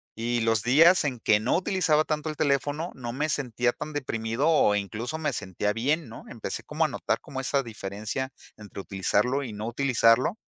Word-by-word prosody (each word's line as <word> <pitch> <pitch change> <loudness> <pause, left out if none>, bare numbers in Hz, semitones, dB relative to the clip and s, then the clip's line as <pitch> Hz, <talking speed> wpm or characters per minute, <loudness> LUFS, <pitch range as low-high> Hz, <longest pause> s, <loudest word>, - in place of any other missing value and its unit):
y 120 +1 -1
los 115 -1 +2
días 160 +7 +5
en 125 -4 -2
que 105 -1 +3
no 115 - +1
utilizaba 175 -4 +2
tanto 155 0 -2
el 155 - -4
teléfono 145 +4 0
no 120 -2 -6
me 150 +4 -1
sentía 120 -4 0
tan 150 +3 -7
deprimido 125 +1 -1
o 105 -10 +4
incluso 110 +9 -3
me 155 -2 -1
sentía 105 0 -2
bien, 135 +5 -1
¿no? 115 - -10
Empecé - - -5
como - - -1
a - - +3
notar - - -2
como 130 - -7
esa 135 +1 0
diferencia 110 +4 -5 0.2
entre 105 -2 -9
utilizarlo 105 +8 0
y 115 -5 -6
no 105 +2 -5
utilizarlo. 125 - +3
125 Hz, 190 wpm, -26 LUFS, 110-150 Hz, 0.2 s, días